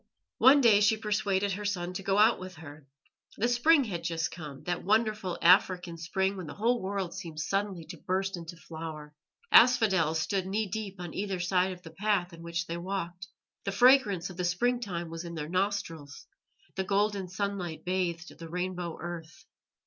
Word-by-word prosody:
One 280 Hz, +2 st, +7 dB
day 215 Hz, -5 st, +6 dB
she 215 Hz, +1 st, +4 dB
persuaded 205 Hz, -2 st, 0 dB
her 200 Hz, +2 st, -4 dB
son 180 Hz, -3 st, -2 dB
to 185 Hz, -, -4 dB
go 195 Hz, +1 st, 0 dB
out 220 Hz, +3 st, +5 dB
with 185 Hz, 0 st, -8 dB
her. 150 Hz, -2 st, -12 dB, 0.5 s
The 230 Hz, -, +2 dB
spring 275 Hz, +5 st, +4 dB
had 175 Hz, -8 st, -4 dB
just 165 Hz, -1 st, -1 dB
come 150 Hz, -5 st, -9 dB
that 175 Hz, -1 st, -2 dB
wonderful 215 Hz, -2 st, +1 dB
African 180 Hz, -1 st, +4 dB
spring 190 Hz, +4 st, -1 dB
when 185 Hz, -4 st, -7 dB
the -, -, -8 dB
whole 235 Hz, +3 st, +1 dB
world 190 Hz, -2 st, -3 dB
seems 165 Hz, -5 st, -5 dB
suddenly 195 Hz, -4 st, -2 dB
to 170 Hz, +2 st, -9 dB
burst 190 Hz, +4 st, -1 dB
into 170 Hz, 0 st, -8 dB
flower. 160 Hz, -2 st, -8 dB, 0.4 s
Asphodels 190 Hz, -10 st, +5 dB
stood 190 Hz, +2 st, -1 dB
knee 210 Hz, +3 st, 0 dB
deep 200 Hz, 0 st, -5 dB
on 175 Hz, -2 st, -6 dB
either 195 Hz, -2 st, -3 dB
side 180 Hz, +1 st, +1 dB
of 180 Hz, -1 st, -10 dB
the 165 Hz, -, -10 dB
path 190 Hz, 0 st, 0 dB
in 165 Hz, -, -11 dB
which 170 Hz, 0 st, -3 dB
they 170 Hz, 0 st, -4 dB
walked; 175 Hz, -1 st, -4 dB, 0.4 s
the 195 Hz, -, -2 dB
fragrance 205 Hz, -5 st, +4 dB
of 180 Hz, -, -12 dB
the 180 Hz, -, -2 dB
springtime 180 Hz, -3 st, -1 dB
was 165 Hz, +1 st, -5 dB
in 170 Hz, -1 st, -7 dB
their 150 Hz, -2 st, -4 dB
nostrils; 180 Hz, -6 st, -2 dB, 0.5 s
the 190 Hz, -, -2 dB
golden 200 Hz, 0 st, 0 dB
sunlight 185 Hz, -3 st, -4 dB
bathed 180 Hz, -2 st, -2 dB
the 165 Hz, -1 st, -8 dB
rainbow 180 Hz, -1 st, -3 dB
earth. 165 Hz, -3 st, -8 dB
185 Hz, 180 wpm, -29 LUFS, 170-200 Hz, 0.5 s, One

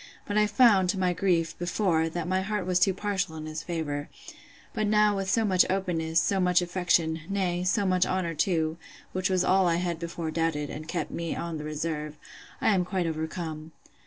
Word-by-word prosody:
but 205 Hz, -, -3 dB
I 210 Hz, 0 st, +4 dB
found, 205 Hz, -4 st, +5 dB
to 190 Hz, -, 0 dB
my 180 Hz, -1 st, +2 dB
grief, 170 Hz, -2 st, +1 dB
before, 175 Hz, -2 st, +1 dB
that 170 Hz, 0 st, -4 dB
my 185 Hz, +1 st, +1 dB
heart 205 Hz, -1 st, -2 dB
was 180 Hz, -1 st, +2 dB
too 195 Hz, +1 st, +4 dB
partial 190 Hz, -4 st, -2 dB
in 155 Hz, -1 st, -6 dB
his 155 Hz, 0 st, -5 dB
favour; 150 Hz, -4 st, -4 dB, 0.6 s
but 215 Hz, -, 0 dB
now 210 Hz, 0 st, +4 dB
with 195 Hz, -1 st, -2 dB
so 225 Hz, +2 st, +2 dB
much 185 Hz, -3 st, +4 dB
openness, 170 Hz, -4 st, 0 dB
so 195 Hz, +2 st, +1 dB
much 180 Hz, -1 st, +4 dB
affection; 175 Hz, -2 st, +1 dB
nay, 180 Hz, -3 st, -1 dB
so 200 Hz, +3 st, +1 dB
much 185 Hz, -1 st, +2 dB
honour 185 Hz, -3 st, -1 dB
too, 160 Hz, 0 st, 0 dB, 0.4 s
(which 185 Hz, 0 st, 0 dB
was 185 Hz, -1 st, +2 dB
all 185 Hz, 0 st, +3 dB
I 170 Hz, -, +2 dB
had 170 Hz, -1 st, -2 dB
before 170 Hz, -1 st, -4 dB
doubted, 160 Hz, -2 st, -1 dB
and 155 Hz, +1 st, -7 dB
kept 170 Hz, +1 st, -3 dB
me 170 Hz, -1 st, -3 dB
on 170 Hz, -2 st, -4 dB
the -, -, -6 dB
reserve,) 150 Hz, 0 st, -4 dB, 0.4 s
I -, -, +2 dB
am 185 Hz, -2 st, +2 dB
quite 180 Hz, -1 st, -2 dB
overcome. 160 Hz, 0 st, -4 dB
175 Hz, 200 wpm, -27 LUFS, 160-190 Hz, 0.6 s, found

